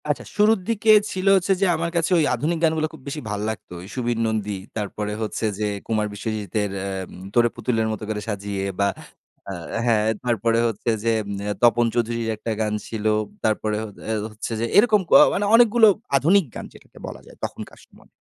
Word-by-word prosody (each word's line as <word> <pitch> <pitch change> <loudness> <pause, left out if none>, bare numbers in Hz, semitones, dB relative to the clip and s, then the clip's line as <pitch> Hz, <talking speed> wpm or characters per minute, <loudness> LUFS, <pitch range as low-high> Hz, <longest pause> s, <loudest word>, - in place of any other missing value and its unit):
আচ্ছা। 150 - -1
শুরুর 210 +1 +4
দিকে 225 -1 +3 0.2
ছিল 190 +1 -3
হচ্ছে 190 +1 +2
যে - - +5
আমার 170 +1 -2
কাছে 170 +1 +1
ওই 155 - +3
আধুনিক 165 +3 -1
গানগুলো 160 -1 +2
খুব 160 - -12
বেশি 150 +2 -4
ভাল 105 -1 -2
লাগতো। 110 -4 -7 0.2
সুবীর 120 -2 -1
নন্দী 105 -2 -2 0.2
তারপরে 105 0 -3
হচ্ছে 110 +1 -2
যে 105 - 0 0.2
কুমার 110 -2 0
বিশ্বজিতের 105 -1 -3 0.6
"তোরে 120 0 +4
পুতুলের 115 -1 0
মত 110 - -5
করে 105 -1 -2
সাজিয়ে" 100 -2 -3 0.2
বা 100 - +3 1.0
হ্যাঁ, 110 -3 +3 0.2
তারপরে 115 -1 +1
হচ্ছে 115 +1 -3
যে 115 - +2 0.5
তপন 120 0 +5
চৌধুরীর 115 -1 -1
একটা 115 +2 -5
গান 105 -1 0
ছিল। 110 -2 -5 0.4
তারপরে 110 -1 0
হ - - -4 0.2
আ - - 0 0.2
হচ্ছে 110 +2 -6
যে 115 - 0
এরকম 210 -1 +5
ক - - -19 0.2
মানে 205 - 0
অনেকগুলো 230 -1 +6 0.3
আধুনিক 175 +7 +4
গান - - -6
যেটাকে - - -18
বলা - - -8
যায় - - -16
তখনকার - - -6
সময়ে। - - -22
115 Hz, 175 wpm, -23 LUFS, 105-160 Hz, 1.0 s, অনেকগুলো